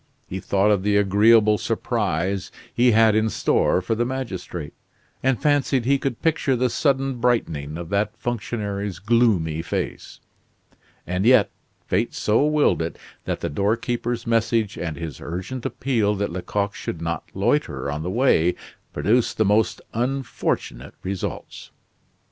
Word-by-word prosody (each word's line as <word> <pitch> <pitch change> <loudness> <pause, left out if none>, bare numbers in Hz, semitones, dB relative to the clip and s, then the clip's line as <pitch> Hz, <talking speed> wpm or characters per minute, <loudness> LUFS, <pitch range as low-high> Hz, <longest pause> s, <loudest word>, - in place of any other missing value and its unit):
He 95 - -5
thought 100 +2 +2
of 100 -3 +2
the 100 +1 +2
agreeable 105 +2 +5
surprise 100 -5 -1 0.2
he 125 +1 +4
had 110 -1 +5
in 110 +1 +2
store 95 - +1
for 100 - 0
the 115 +2 0
magistrate, 100 - -5 0.5
and 130 -3 +1
fancied 140 -4 +1
he 140 +2 +3
could 130 -4 -3
picture 155 -4 +2
the 125 0 +1
sudden 135 -2 +1
brightening 80 -12 0
of 85 -1 -7
that 105 +2 -1
functionary's 105 -5 -3
gloomy 100 -8 +2
face. - - -4 0.9
And 90 +2 -1
yet, 120 -2 +5 0.3
fate 105 +6 0
so 110 +5 +2
willed 150 - +2
it 80 +1 -4 0.3
that - - -3
the - - -2
doorkeeper's 115 +7 -1
message 115 -2 +1
and 80 -4 -4
his 80 -5 -6
urgent 95 +9 -4
appeal 115 -6 0
that 100 -1 -2
Lecoq 100 +3 -2
should 85 - -5
not 85 -1 -3
loiter 95 - 0
on 75 +1 -4
the 85 - -3
way, 95 -6 +3 0.4
produced 110 +11 +1
the 110 - +3
most 105 +2 +2
unfortunate 125 - -2
results. 95 0 -5
105 Hz, 145 wpm, -23 LUFS, 90-120 Hz, 0.9 s, agreeable